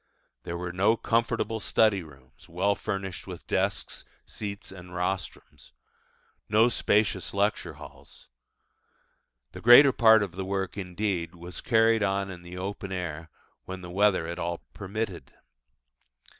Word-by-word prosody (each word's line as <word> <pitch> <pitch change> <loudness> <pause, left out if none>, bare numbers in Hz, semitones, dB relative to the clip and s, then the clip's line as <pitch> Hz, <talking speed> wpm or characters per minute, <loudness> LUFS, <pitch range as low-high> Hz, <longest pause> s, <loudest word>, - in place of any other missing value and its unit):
There 85 -1 -4
were 90 0 -5
no 100 +5 +3
comfortable 115 -1 0
study 110 -2 +2
rooms, 75 +3 -17
well 95 +4 +1
furnished 95 -3 -5
with - - -8
desks, - - -1 0.2
seats, 100 -2 -6
and 90 -1 -11
rostrums: 90 0 -4 0.8
no 110 +3 +5
spacious 105 -5 +1
lecture 100 +2 0
halls. - - -14 1.2
The - - -10
greater 120 +4 +9
part 110 -2 +6
of 100 - -4
the 95 +2 -5
work, 95 -1 -3
indeed, 90 -3 -3
was 85 +1 -8
carried 115 -1 +3
on 100 -1 0
in 90 -2 -9
the 85 +1 -10
open 95 +1 -5
air 85 -3 -4 0.4
when 95 0 -7
the 90 -1 -8
weather 95 -2 +3
at 85 +1 -5
all 85 0 -3
permitted. 100 - -5
95 Hz, 135 wpm, -27 LUFS, 90-105 Hz, 1.2 s, greater